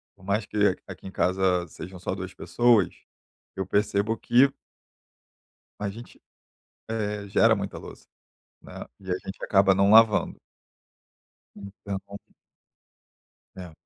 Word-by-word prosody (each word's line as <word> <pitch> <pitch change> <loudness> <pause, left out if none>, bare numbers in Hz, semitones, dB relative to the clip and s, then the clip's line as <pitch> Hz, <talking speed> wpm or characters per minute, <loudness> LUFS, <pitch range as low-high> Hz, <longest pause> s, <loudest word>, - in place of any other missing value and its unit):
por - - -22
mais 100 +2 -1
que 105 -2 +1
aqui - - -10
em - - -8
casa 90 -1 +1
sejam 90 +3 -10
só 90 - -3
duas 95 -1 -7
pessoas, 120 -6 +2 0.7
eu 95 - -3
percebo 105 +2 0
que 130 +5 +4 1.3
a 105 - -2
gente, 115 +4 -12 0.7
eh, 105 -2 -3
gera 115 +3 +4
muita 100 0 -5
louça, - - -12 0.6
né, - - -13 0.3
e 95 -1 -12
a 90 - 0
gente 95 - -8
acaba 95 -1 +4
não 100 +1 +3
lavando. 110 -1 +5 1.2
Então 100 -1 -7 1.6
É. 90 -3 -9
100 Hz, 120 wpm, -26 LUFS, 95-105 Hz, 1.6 s, lavando